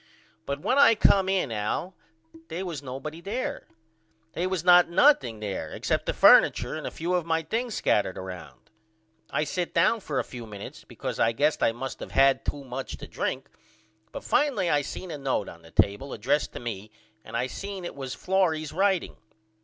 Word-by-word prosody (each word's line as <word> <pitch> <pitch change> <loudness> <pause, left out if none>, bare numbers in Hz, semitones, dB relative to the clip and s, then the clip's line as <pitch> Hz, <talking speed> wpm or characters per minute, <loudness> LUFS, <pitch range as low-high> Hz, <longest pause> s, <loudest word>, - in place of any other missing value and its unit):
But 140 +1 -3
when 265 - +2
I 280 -5 +7
come 195 -2 +4
in 190 -10 0
Al 110 - -2 0.5
they 170 +3 -4
was 165 -6 -5
nobody 145 +5 -7
there. 220 +8 -4 0.7
They 175 +2 -1
was 185 -3 -2
not 180 -1 +7
nothing 170 - +4
there 95 -7 -4
except - - -2
the - - +1
furniture - - +6
and - - -5
a - - -2
few 170 +3 -3
of 180 -1 +1
my 165 0 +1
things 230 +7 -2
scattered 100 -3 +1
round. 90 -8 -9 0.6
I - - 0
sit 175 +3 -3
down 170 +7 +3
for 150 -9 -4
a - - +1
few 120 -3 -9
minutes 100 -2 -9
because - - -6
I 115 - +3
guess 150 +6 +1
I - - +4
must 125 +3 -6
of - - -8
had 135 0 +4
to 145 -1 -3
much 130 0 -6
to - - -9
drink - - -3 0.6
but - - -7
finally 245 - +1
I 145 - +3
seen 175 +5 -7
a 150 - -6
note 130 -7 -1
on 85 - -11
the 80 - -16
table 100 +11 +1
addressed 140 +8 0
to - - -6
me 110 -3 -6 0.3
and 115 +2 -5
I 120 - 0
seen 195 +6 -6
it - - -5
was 135 -2 -6
Florrie's 170 -5 0
writeing. 190 0 +1
150 Hz, 190 wpm, -27 LUFS, 120-185 Hz, 0.7 s, I